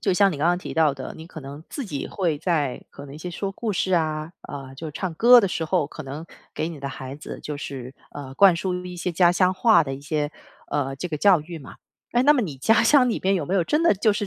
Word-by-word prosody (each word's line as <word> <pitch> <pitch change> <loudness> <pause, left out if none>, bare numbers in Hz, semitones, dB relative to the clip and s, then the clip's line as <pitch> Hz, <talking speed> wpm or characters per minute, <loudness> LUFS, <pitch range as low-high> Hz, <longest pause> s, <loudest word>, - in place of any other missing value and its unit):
就 - - +1
像 195 +1 +4
你 150 - -5
刚 155 +4 +1
刚 175 - +2
提 - - -7
到 160 -3 +3
的， 135 -1 -7
你 160 +1 -11
可 - - -10
能 140 +2 -9
自 280 - -4
己 145 -9 -5
会 170 -6 -1
在 150 -6 -1
可 140 - -11
能 135 - -11
一 - - -9
些 180 +3 -6
说 195 +3 -4
故 215 +1 -3
事 185 +1 -1
啊， 155 -1 -1
呃， 135 -2 -8
就 155 +3 -7
唱 170 +3 -4
歌 240 +7 +7
的 200 - +1
时 170 -2 -2
候， 160 -2 +1
可 155 - -9
能 145 +4 -7 0.3
给 160 - -2
你 160 -4 -8
的 140 - -4
孩 130 0 -7
子， 150 - -8
就 150 - -5
是， 135 -2 -7 0.2
呃， 135 -2 -8
灌 195 -1 +6
输 180 +1 -3
一 180 0 -7
些 175 +1 -3
家 175 +1 +5
乡 185 +1 +2
话 185 -6 +5
的 135 - -4
一 135 - -9
些， 150 0 -2 0.3
呃， 135 -2 -2
这 160 - -4
个 160 -3 -3
教 185 +1 +5
育 165 +3 -9
嘛。 - - -12 0.4
诶， 240 +1 +3
那 290 - +6
么 285 - +1
你 165 - -4
家 220 - +3
乡 270 -4 +5
里 230 - -1
边 195 +1 +2
有 165 - -2
没 190 - -1
有 185 - +3
真 300 - +1
的 335 - +4
就 210 +2 +2
是 205 - -2
165 Hz, 300 characters per minute, -24 LUFS, 145-190 Hz, 0.4 s, 歌